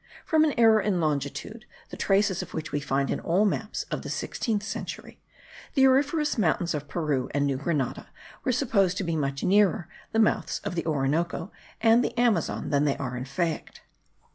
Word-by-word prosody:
From 315 -1 +4
an 305 -2 +2
error 225 -2 +6
in 195 -3 0
longitude, 155 +8 -3 0.3
the - - -6
traces 195 -2 +2
of - - -8
which 155 -1 -4
we 145 - 0
find 140 -1 -1
in - - -1
all 185 +6 +2
the 205 - +3
maps 220 -1 -3
of - - -2
the - - -7
16th 215 -4 -2
century, - - -6 0.5
the 265 -2 +6
auriferous 290 +1 +2
mountains 175 -2 +1
of 145 -1 -4
Peru 150 -7 -1
and 145 0 +2
New 140 -2 0
Granada 145 -2 -2 0.4
were 255 - +1
supposed 205 -7 +1
to 200 - -1
be 165 -2 -1
much 140 -2 -2
nearer 200 -2 +3 0.2
the - - -1
mouths 220 -1 +2
of - - -3
the 170 -1 -3
Orinoco 160 +5 -1 0.3
and 225 +2 +5
the 240 - -2
Amazon 225 -10 +1
than 145 0 +3
they 140 - +1
are 125 -2 -4
in 125 +1 -4
fact. 160 +3 -3
175 Hz, 190 wpm, -27 LUFS, 145-220 Hz, 0.5 s, error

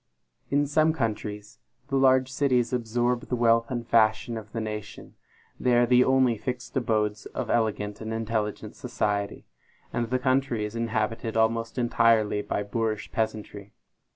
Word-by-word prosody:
In 145 +1 +2
some 155 +2 +3
countries, 110 -4 -4 0.3
the 135 - -1
large 130 -1 +4
cities 130 -3 +1
absorb 120 +1 0
the 125 - -1
wealth 115 -1 +3
and 120 -3 -4
fashion 110 +1 +3
of 110 -2 -8
the 115 - -3
nation; 105 -1 -6 0.5
they 125 -1 +2
are 120 - +5
the 125 +1 +5
only 130 -4 +3
fixed 125 +2 -5
abodes 110 -4 0
of 125 -4 -4
elegant 105 -2 -1
and 110 0 -5
intelligent 110 -1 -3
society, 105 -6 -2 0.5
and 120 -1 -1
the 130 - +1
country 130 -3 +1
is 105 +2 -7
inhabited 115 0 -2
almost 115 +1 +1
entirely 115 -3 +3
by 105 - -2
boorish 110 0 -2
peasantry. 105 -2 -4
115 Hz, 150 wpm, -26 LUFS, 110-125 Hz, 0.5 s, are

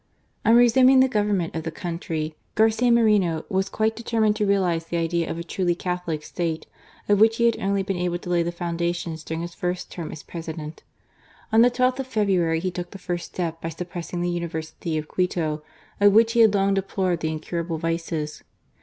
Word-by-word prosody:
On 225 - +5
resuming 255 +2 +6
the 260 - +6
government 205 -8 0
of 160 - -1
the 165 - -4
country, 160 -2 -4 0.2
Garcia 220 +2 +3
Moreno 210 -9 +3
was 190 -1 0
quite 220 +1 0
determined 220 -2 +1
to 210 -2 +1
realize 180 -4 +1
the 170 - -2
idea 170 0 0
of - - -3
a 170 - -4
truly 175 0 -1
Catholic 180 -4 -3
State, 165 -2 -3 0.4
of 205 -1 +4
which 225 +1 +5
he 235 - +2
had 235 - +2
only 195 0 0
been 195 -1 -2
able 175 0 -1
to 175 - -9
lay 175 -1 +3
the 170 +1 -1
foundations 170 -1 -3
during 160 +1 -4
his 170 0 -6
first 180 0 -3
term 165 -3 -6
as 155 - -9
President. 160 -2 -7 0.7
On 225 - +7
the 245 - +7
12th 255 +1 +1
of 265 - -3
February 190 -8 +1
he 185 +2 -2
took 175 0 -5
the - - -9
first 175 -2 -4
step 165 -2 -4
by 165 - -3
suppressing 175 +1 -5
the 175 - 0
University 160 -1 -4
of 155 0 -4
Quito, 165 -4 -1 0.4
of 205 0 +6
which 225 +1 +5
he 235 - +2
had 220 -3 +6
long 195 0 +2
deplored 190 -2 0
the 160 - -1
incurable 165 +1 -3
vices. 165 -2 -3
175 Hz, 200 wpm, -24 LUFS, 165-205 Hz, 0.7 s, On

